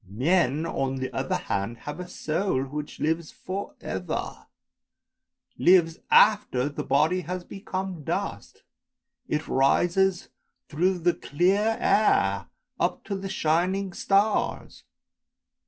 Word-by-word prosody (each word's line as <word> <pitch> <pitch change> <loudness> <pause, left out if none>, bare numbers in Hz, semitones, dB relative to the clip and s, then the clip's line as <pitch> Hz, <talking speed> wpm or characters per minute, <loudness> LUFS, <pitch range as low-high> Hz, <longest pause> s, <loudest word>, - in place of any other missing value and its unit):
Men, 150 - +1
on 135 -5 -2
the 130 -1 -4
other - - -1
hand, 100 +4 -3
have 150 +3 -5
a 180 - -6
soul 160 -4 -1
which 150 +2 -6
lives 160 +1 -1
for 195 +2 -6
ever, - - -4 1.1
lives 170 -3 +4
after 145 -11 +4
the 145 - -5
body 160 +6 +2
has 180 +2 -5
become 190 -3 -5
dust; - - -4 0.6
it 150 +1 -2
rises 175 +7 +2 0.4
through 180 +5 +1
the 175 0 +2
clear 195 +9 +1
air, 100 - +2 0.3
up - - 0
to 200 - -4
the 195 0 -5
shining 180 +4 0
stars! 200 +4 0
170 Hz, 115 wpm, -26 LUFS, 145-190 Hz, 1.1 s, lives